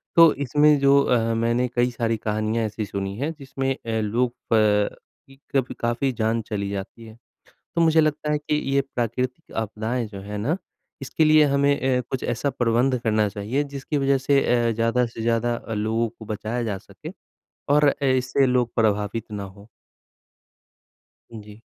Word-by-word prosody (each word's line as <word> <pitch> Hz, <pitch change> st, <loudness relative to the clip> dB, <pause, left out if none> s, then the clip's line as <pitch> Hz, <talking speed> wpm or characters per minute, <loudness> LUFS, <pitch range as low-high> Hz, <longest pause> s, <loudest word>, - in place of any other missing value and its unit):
तो 165 Hz, -2 st, +8 dB
इसमें 145 Hz, +2 st, +3 dB
जो 140 Hz, 0 st, +5 dB
अह, 115 Hz, -3 st, +1 dB
मैंने 115 Hz, +2 st, +1 dB
कई 120 Hz, 0 st, +2 dB
सारी 115 Hz, -1 st, -1 dB
कहानियाँ 110 Hz, +1 st, -1 dB
ऐसी 110 Hz, 0 st, -4 dB
सुनी 100 Hz, 0 st, -4 dB
हैं 145 Hz, +6 st, -2 dB
जिसमें 135 Hz, 0 st, -2 dB
अ, 115 Hz, -2 st, -3 dB
लोग 120 Hz, +4 st, 0 dB, 0.2 s
प 105 Hz, -2 st, +3 dB, 0.3 s
इ 135 Hz, -, -16 dB, 0.2 s
का 135 Hz, -, +4 dB
भी 130 Hz, -, -9 dB
काफ़ी 120 Hz, +3 st, 0 dB
जान 115 Hz, 0 st, 0 dB
चली 100 Hz, -2 st, -4 dB
जाती 100 Hz, +3 st, -6 dB
है। 110 Hz, 0 st, -13 dB, 0.6 s
तो 170 Hz, -, +2 dB
मुझे 160 Hz, -1 st, +5 dB
लगता 150 Hz, 0 st, 0 dB
है 150 Hz, -, +2 dB
कि 150 Hz, 0 st, -2 dB, 0.2 s
ये 140 Hz, -, +4 dB
प्राकृतिक 125 Hz, +5 st, -3 dB
आपदाएँ 110 Hz, +2 st, -2 dB
जो 100 Hz, -2 st, -9 dB
हैं 105 Hz, +1 st, -6 dB
ना, 135 Hz, -, -1 dB, 0.4 s
इसके 135 Hz, +4 st, +1 dB
लिए 155 Hz, 0 st, +6 dB
हमें 140 Hz, -2 st, +2 dB
अ, -, -, -1 dB
कुछ 130 Hz, -, -3 dB
ऐसा 125 Hz, +4 st, -1 dB
प्रबंध 125 Hz, +1 st, +1 dB
करना 110 Hz, -1 st, +2 dB
चाहिए 105 Hz, +8 st, -2 dB
जिसकी 140 Hz, +1 st, -4 dB
वज़ह 135 Hz, 0 st, +2 dB
से 140 Hz, +1 st, +2 dB, 0.3 s
अ, -, -, +1 dB
ज़्यादा 115 Hz, +2 st, +1 dB
से 115 Hz, -1 st, -8 dB
ज़्यादा 115 Hz, +1 st, +1 dB
अ 115 Hz, -, -7 dB
लोगों 110 Hz, +2 st, 0 dB
को 115 Hz, 0 st, -13 dB
बचाया 110 Hz, +3 st, -3 dB
जा 105 Hz, -4 st, -2 dB
सके -, -, -11 dB, 0.6 s
और 150 Hz, +1 st, +5 dB
अ, 140 Hz, 0 st, -3 dB
इससे 130 Hz, +1 st, +2 dB
लोग 125 Hz, -2 st, +1 dB
प्रभावित 105 Hz, 0 st, 0 dB
ना 105 Hz, -1 st, -4 dB
हों। 100 Hz, +1 st, -12 dB, 1.7 s
हाँ 110 Hz, -, -8 dB
जी। 105 Hz, +1 st, -14 dB
120 Hz, 180 wpm, -23 LUFS, 110-135 Hz, 1.7 s, तो